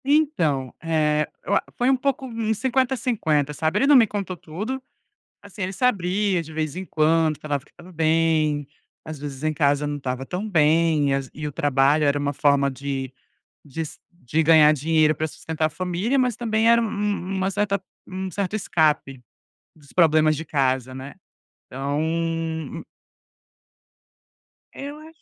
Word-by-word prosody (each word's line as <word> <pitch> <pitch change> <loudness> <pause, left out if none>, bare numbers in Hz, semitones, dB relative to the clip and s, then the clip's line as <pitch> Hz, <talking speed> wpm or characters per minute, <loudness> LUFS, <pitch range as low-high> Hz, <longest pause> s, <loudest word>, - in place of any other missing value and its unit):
Então, 170 - +1
eh, 155 -2 +1 0.2
eu - - +1
a - - +2
foi 245 +2 +2
um 270 - +5
pouco 265 0 -1
uns 225 -3 -2
50, 260 +1 +1
50, 160 - 0
sabe. 160 +6 0
Ele 275 - +3
não 290 - +7
me 235 -4 +7
contou 195 -3 -4
tudo, 210 +12 -5 0.6
assim, 200 0 -7
ele 185 +1 -3
se 195 - -6
abria 195 -4 +1
de 160 -1 -10
vez 155 -1 -2
em 190 +1 -5
quando, 160 -1 +2
falava 145 -3 -3
que - - -26
estava 175 +1 -15
bem, 160 -2 +1 0.4
às 155 -2 -8
vezes 140 -1 -7
em 155 0 +1
casa 145 -1 +2
não 145 0 -3
estava 130 -1 -4
tão 185 +8 -4
bem, 160 -3 +3
e - - +2
as 135 0 -1
ve - - -23
e 150 - -2
o - - -4
trabalho 145 +2 +2
era 140 0 +2
uma 145 0 -1
forma 140 -1 +2
de 135 -1 -4 0.6
de 160 +3 -4
se - - -12
de 160 -3 -1
ganhar 155 -1 +6
dinheiro 155 +1 +2
pra 155 - -2
sustentar 160 0 -3
a - - 0
família, 185 - -1
mas 250 -2 +2
também 225 -1 +1
era 235 0 +6
um - - 0
um 205 -3 -2
uma 190 0 0
certa 200 0 0 0.3
um 190 0 -5
certo 200 +2 -2
escape 150 -8 0 0.5
dos 145 -3 -20
problemas 155 -3 +4
de 155 - -5
casa, 130 -3 0
né. 135 +2 -8 0.5
Então 160 +3 -2 1.9
Eu 285 +2 -7
acho 315 +1 -15
160 Hz, 175 wpm, -23 LUFS, 145-200 Hz, 1.9 s, não